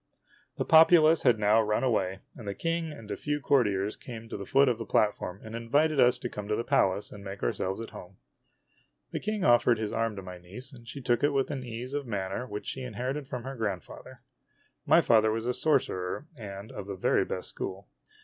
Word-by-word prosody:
The -, -, -1 dB
populace 160 Hz, 0 st, +7 dB
had 125 Hz, -4 st, +4 dB
now 105 Hz, +1 st, +4 dB
run 105 Hz, +2 st, 0 dB
away, 95 Hz, -6 st, 0 dB
and 115 Hz, -5 st, -10 dB
the 100 Hz, -, -3 dB
King 165 Hz, -1 st, -2 dB
and 115 Hz, -8 st, -10 dB
a -, -, -1 dB
few 150 Hz, 0 st, -2 dB
cour 140 Hz, -2 st, +4 dB
tiers 100 Hz, 0 st, -1 dB
came 115 Hz, -2 st, -9 dB
to -, -, -5 dB
the 100 Hz, -1 st, -6 dB
foot 140 Hz, +1 st, +5 dB
of 120 Hz, -2 st, +1 dB
the -, -, -3 dB
platform 100 Hz, -3 st, 0 dB
and 110 Hz, 0 st, -9 dB
invited 145 Hz, +6 st, +1 dB
us 125 Hz, -1 st, +5 dB
to -, -, -4 dB
come 105 Hz, -3 st, -7 dB
to 105 Hz, -, +1 dB
the 115 Hz, -, -2 dB
Palace 95 Hz, -2 st, +1 dB
and 100 Hz, -1 st, -10 dB
make 100 Hz, 0 st, -7 dB
ourselves 95 Hz, -, -1 dB
at 115 Hz, -, -8 dB
home. 90 Hz, +1 st, -11 dB, 0.9 s
The -, -, -2 dB
King 215 Hz, -2 st, -2 dB
offered 120 Hz, -1 st, +5 dB
his 110 Hz, -1 st, -3 dB
arm 115 Hz, -1 st, 0 dB
to 95 Hz, -, -7 dB
my 90 Hz, -1 st, -9 dB
niece, 110 Hz, +11 st, -10 dB
and 120 Hz, -2 st, -14 dB
she 140 Hz, -, -7 dB
took 120 Hz, -2 st, +1 dB
it 145 Hz, 0 st, +3 dB
with 135 Hz, -1 st, +1 dB
an 135 Hz, -3 st, -4 dB
ease 120 Hz, +2 st, -6 dB
of 145 Hz, -2 st, -3 dB
manner 100 Hz, +2 st, -3 dB
which 105 Hz, -2 st, -6 dB
she 130 Hz, -, -5 dB
inher 125 Hz, +1 st, -3 dB
ited 145 Hz, -2 st, -6 dB
from 125 Hz, -3 st, -5 dB
her 135 Hz, +1 st, -6 dB
grandfather. 100 Hz, -7 st, -5 dB, 0.7 s
My -, -, +6 dB
father 110 Hz, -1 st, +4 dB
was 115 Hz, +1 st, -2 dB
a 125 Hz, -, 0 dB
sorcerer, 125 Hz, -6 st, 0 dB
and 100 Hz, -3 st, -8 dB
of 100 Hz, -, -7 dB
the 100 Hz, -, -4 dB
very 95 Hz, -, +2 dB
best -, -, -5 dB
school. 95 Hz, +1 st, -6 dB
115 Hz, 225 wpm, -29 LUFS, 100-135 Hz, 0.9 s, populace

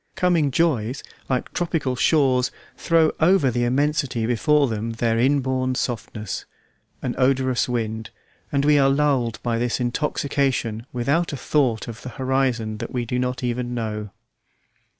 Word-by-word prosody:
Coming 175 Hz, -6 st, +2 dB
joys, 130 Hz, -5 st, 0 dB, 0.3 s
like 130 Hz, -2 st, -1 dB
tropical 165 Hz, -7 st, -1 dB
shores, 130 Hz, -3 st, +3 dB, 0.3 s
throw 165 Hz, -2 st, +3 dB
over 160 Hz, -5 st, +4 dB
the 120 Hz, +1 st, 0 dB
immensity 140 Hz, -2 st, 0 dB
before 140 Hz, +5 st, +3 dB
them 115 Hz, 0 st, -3 dB
their 115 Hz, 0 st, 0 dB
inborn 130 Hz, -1 st, +1 dB
softness, 110 Hz, -4 st, -4 dB, 0.6 s
an 125 Hz, -, -1 dB
odorous 130 Hz, -1 st, +2 dB
wind, 110 Hz, -2 st, -2 dB, 0.4 s
and 140 Hz, 0 st, +1 dB
we 150 Hz, -1 st, +5 dB
are 135 Hz, 0 st, +4 dB
lulled 135 Hz, -5 st, +1 dB
by 115 Hz, -1 st, 0 dB
this 120 Hz, 0 st, 0 dB
intoxication 125 Hz, -2 st, -1 dB
without 140 Hz, +7 st, 0 dB
a -, -, -3 dB
thought 125 Hz, -6 st, 0 dB
of 115 Hz, -2 st, -8 dB
the 130 Hz, -, -7 dB
horizon 130 Hz, -5 st, -1 dB
that -, -, -5 dB
we 125 Hz, -2 st, -2 dB
do 125 Hz, +2 st, -2 dB
not 125 Hz, 0 st, -2 dB
even 120 Hz, 0 st, -2 dB
know. 105 Hz, -2 st, -3 dB
130 Hz, 145 wpm, -23 LUFS, 120-140 Hz, 0.6 s, we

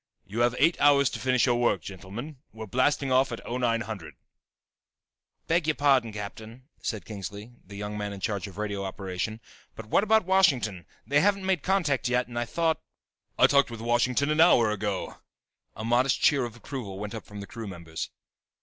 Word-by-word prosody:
"You 105 Hz, +4 st, -5 dB
have 120 Hz, 0 st, +3 dB
eight 170 Hz, -, +3 dB
hours 140 Hz, -2 st, +5 dB
to -, -, -5 dB
finish 130 Hz, -1 st, +2 dB
your 120 Hz, -2 st, +2 dB
work, 120 Hz, 0 st, +2 dB
gentlemen. 105 Hz, -, -8 dB
We're 110 Hz, 0 st, -7 dB
blasting 130 Hz, +5 st, +1 dB
off 130 Hz, +1 st, +3 dB
at 115 Hz, -, -4 dB
0900." 115 Hz, -6 st, -2 dB
"I -, -, -46 dB, 1.3 s
beg 165 Hz, -1 st, +1 dB
your 155 Hz, -, +2 dB
pardon, 135 Hz, -5 st, +3 dB
Captain," 110 Hz, +4 st, -8 dB, 0.2 s
said 110 Hz, -3 st, -4 dB
Kingsley, 105 Hz, +2 st, -7 dB
the 100 Hz, +2 st, -12 dB
young 105 Hz, +1 st, -5 dB
man 105 Hz, 0 st, -3 dB
in 100 Hz, -, -7 dB
charge 100 Hz, -1 st, -2 dB
of 95 Hz, -1 st, -12 dB
radio 100 Hz, -2 st, -3 dB
operation, 95 Hz, +2 st, -4 dB, 0.4 s
"but 110 Hz, -, -8 dB
what 110 Hz, -, +2 dB
about 220 Hz, -1 st, +3 dB
Washington? 130 Hz, -, +2 dB, 0.2 s
They 145 Hz, +1 st, +3 dB
haven't 200 Hz, +2 st, +2 dB
made 190 Hz, -5 st, +1 dB
contact 155 Hz, -10 st, +1 dB
yet 125 Hz, 0 st, +1 dB
and 120 Hz, -1 st, -4 dB
I 120 Hz, -, -1 dB
thought 165 Hz, +5 st, 0 dB, 0.3 s
" -, -, -51 dB
"I -, -, +7 dB
talked 140 Hz, -2 st, +4 dB
with 115 Hz, -1 st, -7 dB
Washington 120 Hz, +5 st, +1 dB
an 155 Hz, +1 st, +3 dB
hour 115 Hz, -8 st, +6 dB
ago!" 105 Hz, -2 st, -3 dB, 0.6 s
A 110 Hz, -, -6 dB
modest 125 Hz, +3 st, +2 dB
cheer 140 Hz, -4 st, +3 dB
of 120 Hz, -1 st, -8 dB
approval 120 Hz, -5 st, -7 dB
went 105 Hz, +2 st, -5 dB
up 110 Hz, -, -7 dB
from 105 Hz, 0 st, -9 dB
the 100 Hz, -, -6 dB
crew 115 Hz, +2 st, -8 dB
members. 85 Hz, -4 st, -6 dB
120 Hz, 195 wpm, -27 LUFS, 105-140 Hz, 1.3 s, I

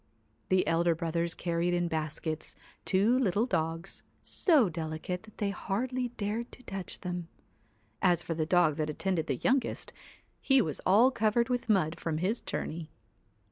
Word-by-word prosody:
214 185 Hz, -, +4 dB
The 185 Hz, -, +1 dB
elder 170 Hz, 0 st, +3 dB
brothers 170 Hz, 0 st, -1 dB
carried 175 Hz, 0 st, 0 dB
in 175 Hz, 0 st, +1 dB
baskets 155 Hz, 0 st, -3 dB, 0.3 s
two 210 Hz, +7 st, +3 dB
little 215 Hz, -2 st, +2 dB
THE 250 Hz, -, -13 dB
dogs, 165 Hz, +3 st, -2 dB, 0.2 s
so 305 Hz, -, +3 dB
delicate 160 Hz, +2 st, -4 dB
that 215 Hz, +1 st, -17 dB
they 205 Hz, -2 st, 0 dB
hardly 245 Hz, +7 st, -2 dB
dared 220 Hz, +3 st, -2 dB
to 255 Hz, -, -14 dB
touch 195 Hz, -4 st, -5 dB
WHITE -, -, -14 dB
them. 180 Hz, -2 st, -3 dB, 0.7 s
As 175 Hz, -2 st, +3 dB
for 165 Hz, -, -2 dB
the 155 Hz, -1 st, -1 dB
dog 170 Hz, -4 st, +4 dB
that 155 Hz, -1 st, -1 dB
attended 170 Hz, +1 st, -1 dB
the 135 Hz, -, 0 dB
youngest, 260 Hz, -, 0 dB
c -, -, -32 dB, 0.5 s
he 270 Hz, -1 st, +4 dB
was 155 Hz, -, -1 dB
all 220 Hz, +8 st, +6 dB
covered 235 Hz, +1 st, +2 dB
with 245 Hz, -2 st, -1 dB
mud 175 Hz, -6 st, +2 dB
from 160 Hz, -2 st, -2 dB
his 195 Hz, +8 st, 0 dB
journey. 160 Hz, 0 st, -4 dB
180 Hz, 175 wpm, -30 LUFS, 165-220 Hz, 0.7 s, all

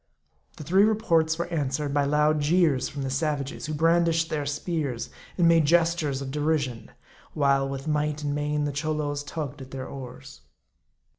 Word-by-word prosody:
The -, -, -7 dB
three 185 Hz, +7 st, +3 dB
reports 170 Hz, -8 st, +2 dB
were 170 Hz, -, -1 dB
answered 145 Hz, -3 st, -2 dB
by 145 Hz, -1 st, +2 dB
loud 150 Hz, +1 st, +2 dB
jeers 155 Hz, -3 st, +2 dB
from 145 Hz, -2 st, -5 dB
the 135 Hz, -, -3 dB
savages, 145 Hz, +1 st, -2 dB
who 155 Hz, -, -3 dB
brandished 165 Hz, +1 st, +2 dB
their 150 Hz, -2 st, -2 dB
spears, 145 Hz, -4 st, -3 dB, 0.3 s
and 175 Hz, -2 st, +4 dB
made 165 Hz, -2 st, +5 dB
gestures 165 Hz, -4 st, +2 dB
of 135 Hz, -, -6 dB
derision; 145 Hz, -5 st, -1 dB, 0.5 s
while 140 Hz, -2 st, +2 dB
with 135 Hz, +2 st, -5 dB
might 150 Hz, 0 st, -1 dB
and 145 Hz, -1 st, -1 dB
main 150 Hz, 0 st, -1 dB
the 145 Hz, -, -1 dB
Cholos 145 Hz, 0 st, -2 dB
tugged 145 Hz, -2 st, -6 dB
at 130 Hz, -, -9 dB
their 130 Hz, 0 st, -6 dB
oars. 130 Hz, -2 st, -10 dB
150 Hz, 165 wpm, -26 LUFS, 140-160 Hz, 0.5 s, made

